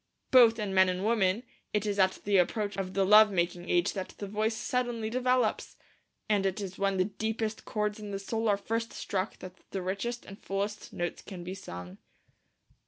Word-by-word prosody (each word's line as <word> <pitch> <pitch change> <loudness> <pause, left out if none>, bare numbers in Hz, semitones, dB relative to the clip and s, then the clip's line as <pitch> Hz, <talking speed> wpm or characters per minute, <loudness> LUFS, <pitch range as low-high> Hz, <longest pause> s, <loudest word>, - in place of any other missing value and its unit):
Both 235 -3 +7
in 210 -3 -3
men 190 -1 +5
and 185 +2 -2
women 215 -1 +2 0.3
it 210 0 +1
is 205 -1 -1
at 190 0 +3
the 200 -1 +3
approach 205 +3 +1
of 190 -1 -4
the 195 -1 +3
love 210 +2 +8
making 175 -1 -1
age 175 0 +2
that 190 -1 -5
the 205 - -5
voice 215 +2 -1
suddenly 235 -2 -1
develops, 250 -2 +1 0.5
and 205 -2 +2
it 195 +1 0
is 195 -2 -6
when 195 -1 +1
the 185 - +3
deepest 220 +1 -3
chords 210 0 -2
in 210 -1 -7
the 200 - -3
soul 225 +3 -1
are 200 - +3
first 225 +3 -3
struck 190 +1 -3
that 185 -1 -9 0.2
the 190 -2 -4
richest 205 +6 -3
and 195 +1 -11
fullest 200 +2 -3
notes 175 0 -3
can 185 -3 -8
be 180 +2 -5
sung. 90 - -9
200 Hz, 195 wpm, -30 LUFS, 190-220 Hz, 0.5 s, love